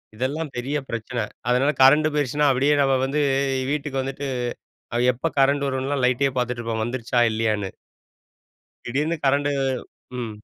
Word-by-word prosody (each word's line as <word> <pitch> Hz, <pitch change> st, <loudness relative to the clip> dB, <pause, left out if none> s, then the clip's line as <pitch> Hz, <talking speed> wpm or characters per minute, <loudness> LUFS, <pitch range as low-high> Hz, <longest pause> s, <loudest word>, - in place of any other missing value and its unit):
இதெல்லாம் 140 Hz, +5 st, -3 dB
பெரிய 135 Hz, +4 st, -1 dB
பிரச்சனை. 115 Hz, +1 st, -3 dB, 0.3 s
அதனால 130 Hz, +4 st, +3 dB
கரண்ட் 150 Hz, +4 st, +6 dB
போயிருச்சுனா 145 Hz, 0 st, +1 dB
அப்படியே 135 Hz, +3 st, +3 dB
நம்ம 135 Hz, -1 st, +3 dB
வந்து 140 Hz, +3 st, -1 dB, 0.5 s
வீட்டுக்கு 145 Hz, -2 st, -2 dB
வந்துட்டு, 135 Hz, +1 st, -4 dB, 0.9 s
எப்ப 130 Hz, +7 st, -2 dB
கரண்ட் 140 Hz, +1 st, +3 dB
வரும்னுலாம் 135 Hz, 0 st, -1 dB
லைட்டே 130 Hz, +2 st, +2 dB
பார்த்துட்டு 125 Hz, -1 st, -1 dB
இருப்போம் 115 Hz, -1 st, -2 dB
வந்துருச்சா 120 Hz, +1 st, -1 dB
இல்லையான்னு. 110 Hz, -3 st, -1 dB, 1.1 s
திடீர்ன்னு 150 Hz, +7 st, -1 dB
கரண்டு 140 Hz, +1 st, +2 dB, 0.7 s
ம். 115 Hz, -3 st, -5 dB
135 Hz, 125 wpm, -23 LUFS, 120-145 Hz, 1.1 s, கரண்ட்